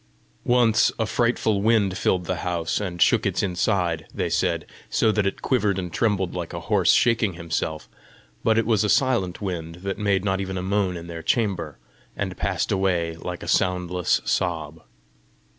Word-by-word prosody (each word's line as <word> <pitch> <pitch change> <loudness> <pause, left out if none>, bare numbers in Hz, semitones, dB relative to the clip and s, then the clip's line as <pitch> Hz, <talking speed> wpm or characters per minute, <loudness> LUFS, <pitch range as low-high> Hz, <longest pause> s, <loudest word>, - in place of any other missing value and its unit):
Once, 120 -3 +4
a 110 - 0
frightful 110 -3 +1
wind 105 -3 +2
filled 90 -1 0
the - - -2
house, 85 -2 -1
and 90 -4 +1
shook - - +3
its - - 0
inside, 90 -3 0
they - - -2
said, - - 0 0.2
so 110 - +2
that 105 -2 +1
it 95 - -4
quivered 105 -7 +1
and 90 -3 -4
trembled 100 -5 0
like 85 -2 -5
a - - -4
horse - - +3
shaking 115 -5 +3
himself; 80 -2 -3 0.6
but 110 0 +3
it 115 - +2
was 110 -2 +2
a 105 - 0
silent 105 -7 +1
wind 85 -4 -4
that 100 +1 -3
made 100 -2 +1
not 95 -1 0
even 95 -1 -4
a 90 - -3
moan 95 -2 0
in 85 - -8
their 85 -1 -7
chamber, 105 -2 -1 0.4
and - - -3
passed - - -1
away 90 -4 0
like 90 +1 -6
a - - -7
soundless 90 -1 +1
sob. 80 -3 -2
95 Hz, 175 wpm, -24 LUFS, 85-105 Hz, 0.6 s, Once